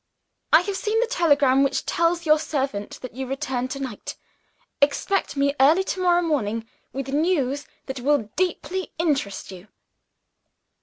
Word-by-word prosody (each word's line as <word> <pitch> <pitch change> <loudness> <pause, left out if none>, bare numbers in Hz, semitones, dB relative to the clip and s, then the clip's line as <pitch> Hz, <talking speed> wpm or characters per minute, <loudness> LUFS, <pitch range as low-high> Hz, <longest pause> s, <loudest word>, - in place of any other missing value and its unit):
"I 315 - +8
have 390 +1 -3
seen 430 +3 0
the 475 - +3
telegram 285 - +3
which 275 0 +1
tells 340 0 +1
your 305 0 +5
servant 270 -10 -3
that 255 - -7
you 265 +1 -5
return 260 -1 -2
to 275 +2 -5
night. 265 -2 -6 0.7
Expect 290 +3 +1
me 280 0 +2
early 310 +8 +5
to 380 - -3
morrow 350 -1 +3
morning 230 -8 -1 0.2
with 270 0 -5
news 285 -2 0 0.2
that 265 -1 -5
will 250 -5 +1
deeply 370 0 -2
interest 275 - -1
you." 185 +2 -11
285 Hz, 150 wpm, -24 LUFS, 260-340 Hz, 0.7 s, I